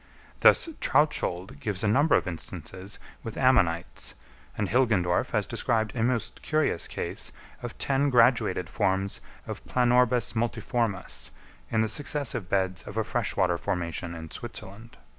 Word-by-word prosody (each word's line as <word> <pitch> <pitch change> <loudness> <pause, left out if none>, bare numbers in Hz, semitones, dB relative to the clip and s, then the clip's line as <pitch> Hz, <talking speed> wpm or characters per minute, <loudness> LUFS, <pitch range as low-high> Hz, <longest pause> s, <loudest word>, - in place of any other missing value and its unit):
Thus - - +6
Trautschold 95 - +1
gives 100 +1 -3
a - - +2
number 140 +8 +4
of - - +1
instances 95 +3 -5 0.2
with 115 - -7
Ammonites, 90 -11 +2 0.4
and 105 - 0
Hilgendorf 100 -6 +2
has - - 0
described 110 -1 0
a 115 - -1
most 120 0 -1
curious 155 - 0
case - - -3 0.3
of 120 -2 -6
ten 140 +1 +2
graduated 115 -7 +3
forms 95 -1 0 0.2
of - - -6
Planorbis 125 -1 +3
multiformis 115 - -2 0.4
in 110 - +2
the - - +1
successive 120 -4 0
beds 95 -1 0
of 105 - -7
a 110 - +2
fresh 120 +1 -2
water 90 -3 +2
formation 85 -1 -2
in 80 -1 -8
Switzerland. 110 +5 -9
110 Hz, 140 wpm, -27 LUFS, 95-120 Hz, 0.4 s, Thus